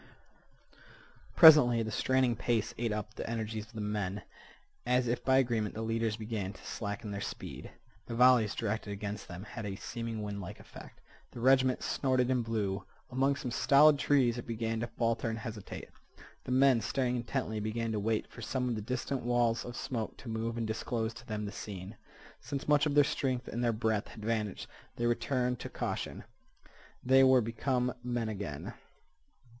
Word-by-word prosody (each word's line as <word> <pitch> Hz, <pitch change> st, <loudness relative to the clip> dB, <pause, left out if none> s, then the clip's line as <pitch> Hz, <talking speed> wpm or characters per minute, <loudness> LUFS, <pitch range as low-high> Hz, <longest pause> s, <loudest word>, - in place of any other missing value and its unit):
Presently 145 Hz, -8 st, +8 dB
the 110 Hz, -, -4 dB
straining 130 Hz, +1 st, +2 dB
pace 115 Hz, -1 st, 0 dB
ate 115 Hz, -2 st, 0 dB
up 105 Hz, 0 st, -4 dB
the -, -, -5 dB
energies 110 Hz, -1 st, -3 dB
of 115 Hz, -, -20 dB
the 110 Hz, -, -5 dB
men. 105 Hz, -2 st, -2 dB, 0.6 s
As 125 Hz, 0 st, +2 dB
if 120 Hz, +1 st, -1 dB
by 130 Hz, 0 st, +4 dB
agreement, 120 Hz, -5 st, +1 dB
the 110 Hz, -, -3 dB
leaders 115 Hz, -1 st, -1 dB
began 105 Hz, -3 st, -4 dB
to -, -, -15 dB
slacken 105 Hz, 0 st, -4 dB
their 100 Hz, 0 st, -4 dB
speed. -, -, -6 dB, 0.4 s
The 115 Hz, -, -4 dB
volleys 125 Hz, -3 st, +5 dB
directed 110 Hz, -1 st, -2 dB
against 100 Hz, 0 st, -5 dB
them 90 Hz, +2 st, -8 dB
had 110 Hz, +2 st, -7 dB
had 100 Hz, -, -3 dB
a -, -, -5 dB
seeming 115 Hz, +1 st, -5 dB
windlike 100 Hz, -1 st, -6 dB
effect. -, -, -13 dB, 0.3 s
The -, -, -8 dB
regiment 130 Hz, +1 st, +4 dB
snorted 130 Hz, -2 st, +1 dB
and 125 Hz, -2 st, +1 dB
blew. 105 Hz, -4 st, -2 dB, 0.3 s
Among 135 Hz, +2 st, +2 dB
some 130 Hz, -3 st, -5 dB
stolid 145 Hz, +4 st, +5 dB
trees 130 Hz, -5 st, +3 dB
it -, -, -8 dB
began 115 Hz, -1 st, -2 dB
to 120 Hz, -, -2 dB
falter 115 Hz, 0 st, -1 dB
and 110 Hz, -, -3 dB
hesitate. 110 Hz, -3 st, -7 dB, 0.6 s
The -, -, -4 dB
men, 130 Hz, -2 st, +5 dB
staring 125 Hz, +3 st, 0 dB
intently, 110 Hz, -2 st, -2 dB
began 110 Hz, +2 st, -2 dB
to 110 Hz, -, -1 dB
wait 110 Hz, +1 st, 0 dB
for -, -, -12 dB
some 125 Hz, +3 st, -1 dB
of 120 Hz, -, 0 dB
the 110 Hz, -, -3 dB
distant 125 Hz, +4 st, -2 dB
walls 120 Hz, -1 st, +1 dB
of 120 Hz, 0 st, -7 dB
smoke 115 Hz, -4 st, -4 dB
to -, -, -12 dB
move 115 Hz, +1 st, -2 dB
and 115 Hz, -, -1 dB
disclose 110 Hz, +1 st, -2 dB
to 120 Hz, +1 st, -13 dB
them 105 Hz, -1 st, -3 dB
the 100 Hz, -, -5 dB
scene. 100 Hz, +1 st, -7 dB, 0.4 s
Since 140 Hz, -1 st, -5 dB
much 150 Hz, 0 st, +4 dB
of 145 Hz, -, -1 dB
their 145 Hz, -, +7 dB
strength 130 Hz, -3 st, -1 dB
and 120 Hz, +2 st, -3 dB
their 120 Hz, -, +3 dB
breath 110 Hz, -1 st, 0 dB
had 105 Hz, -, -10 dB
vanished, 110 Hz, -3 st, -1 dB, 0.3 s
they 120 Hz, -, -2 dB
returned 125 Hz, +1 st, 0 dB
to -, -, -6 dB
caution. -, -, -4 dB, 0.8 s
They 130 Hz, +1 st, +6 dB
were 130 Hz, -1 st, +7 dB
become 125 Hz, +2 st, -1 dB
men 120 Hz, -2 st, -1 dB
again. 95 Hz, -9 st, -5 dB
115 Hz, 180 wpm, -32 LUFS, 110-125 Hz, 0.8 s, Presently